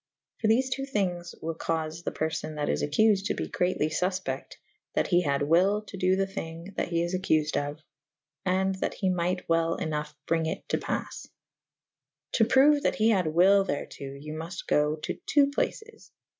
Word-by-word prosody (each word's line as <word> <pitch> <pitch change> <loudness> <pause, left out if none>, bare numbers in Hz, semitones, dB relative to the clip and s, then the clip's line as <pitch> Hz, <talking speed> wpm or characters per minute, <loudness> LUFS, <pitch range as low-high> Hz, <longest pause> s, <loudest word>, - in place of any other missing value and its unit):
For 220 - +1
thefe 255 +4 +3
two 270 - -1
thynges 180 -8 -2
wyll 165 +1 -2
caufe 160 0 -3
the - - -2
perfo;? 155 0 -3
that 150 -1 -2
is 75 - 0
acculed 205 - +3
to - - -1
be - - -3
greatly 180 -4 0
fulpecte 180 -4 -2 0.4
that - - +1
he 175 - +4
had 140 -4 0
wyl 185 +7 +3
to 200 - -9
do 185 0 +2
the 195 0 +1
thyng 170 0 -7
that - - -1
he 170 -1 0
is 175 +2 -3
accufed 155 -5 +1
of/ 145 +2 -3 0.6
and 190 +1 +1
that - - -1
he 190 -3 0
myght 180 +1 -1
welP 165 0 +1
ynoughe 150 -3 -3
brynge 165 -1 +1
it - - -13
to - - +1
paffe. - - -4 1.0
To 225 - +4
proue 275 +5 +5
that - - +1
he 220 +1 +3
had 190 -7 +2
wyll 190 +5 +5
therto: 140 -4 -5
you 150 +2 -7
mult 165 +4 -6
go 150 +1 +2
to 155 - -4 0.2
.ii. 285 - +8
plac^'j. 445 0 -3
175 Hz, 185 wpm, -28 LUFS, 155-195 Hz, 1.0 s, ii